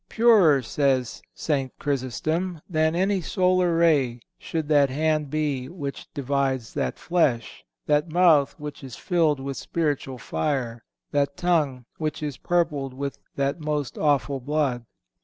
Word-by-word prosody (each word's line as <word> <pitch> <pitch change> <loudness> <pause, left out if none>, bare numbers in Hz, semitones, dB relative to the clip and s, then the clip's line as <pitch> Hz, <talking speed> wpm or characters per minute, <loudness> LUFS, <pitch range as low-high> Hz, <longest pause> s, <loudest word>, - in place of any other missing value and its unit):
"Purer," 200 - +5
says 130 -1 0
St. 135 -4 -1
Chrysostom, 155 +6 -2
"than 160 -1 +1
any 190 +2 +1
solar 180 -1 +2
ray 140 -8 +3 0.2
should 160 -2 -3
that 145 -2 +4
hand 155 +1 0
be 145 -4 -1
which 145 -5 -7
divides 135 -3 -1
that - - -2
flesh, 130 -10 0 0.2
that 150 +2 +2
mouth 160 -4 +4
which 150 -1 -7
is 130 -5 -8
filled 160 - +1
with 135 0 -5
spiritual 145 -5 -2
fire, 120 - -2 0.3
that 140 -1 0
tongue 150 -8 +1
which 155 -1 -3
is 145 -3 -3
purpled 150 -7 0
with 140 +1 -4 0.2
that 140 +4 -1
most 150 -3 -2
awful 140 -3 +1
blood." 130 -3 -1
145 Hz, 135 wpm, -25 LUFS, 135-160 Hz, 0.3 s, Purer